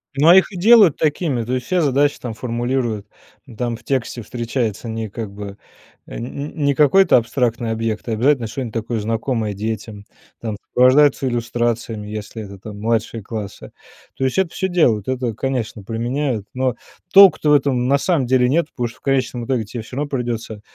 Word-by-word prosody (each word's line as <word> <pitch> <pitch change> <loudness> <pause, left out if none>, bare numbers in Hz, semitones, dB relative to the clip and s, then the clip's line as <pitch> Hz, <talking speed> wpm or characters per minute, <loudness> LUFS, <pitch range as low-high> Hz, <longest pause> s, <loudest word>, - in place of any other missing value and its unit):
Но 155 +5 +6
их 190 +2 +5
и 190 - -7
делают 205 - +6
такими, 145 -5 0
то 120 +3 -4
есть 125 -1 -2
все 185 -1 +1
задачи 145 -1 +2
там 120 -3 -5
формулируют 120 -2 -2 0.5
там 120 0 -2
в 120 - -21
тексте 130 -3 -2
встречается 115 -2 -3
не, 110 -1 -4
как 110 0 -6
бы, 100 0 -8 0.5
э, - - -8
нь 140 +5 -5
нь - - -11
не 140 -1 +2
какой-то 165 +5 +5
абстрактный 120 -1 -1
объект, 110 0 -3
а - - -1
обязательно 125 +1 +2
что-нибудь 120 -1 -5
такое 115 0 -2
знакомое 115 0 -2
детям, 105 0 -5 0.4
там 110 -3 -4
сопровождаются 135 +2 +4
иллюстрациями, 120 -2 -2
если 110 +1 -6
это, 100 -1 -10
там 105 +1 -10
младшие 115 0 -1
классы, 105 -3 -7 0.5
то 135 - -2
есть 130 +7 0
это 190 -3 +2
всё 190 - -2
делают, 120 - +2
это 130 -3 -2
конечно 115 -4 -3
применяют, 120 0 -2
но 130 -1 0 0.4
толку-то 195 -6 +7
в - - +6
этом 130 -3 +2
на 140 +1 +4
самом 155 -3 +1
деле 125 0 +3
нет, 165 +2 +2
потому 120 -2 -2
что 120 - -13
в - - -30
конечном 130 -3 -1
итоге 125 -4 -1
тебе 110 +1 -7
равно 140 +3 -2
придется 120 -5 -4
120 Hz, 180 wpm, -20 LUFS, 110-135 Hz, 0.5 s, толку-то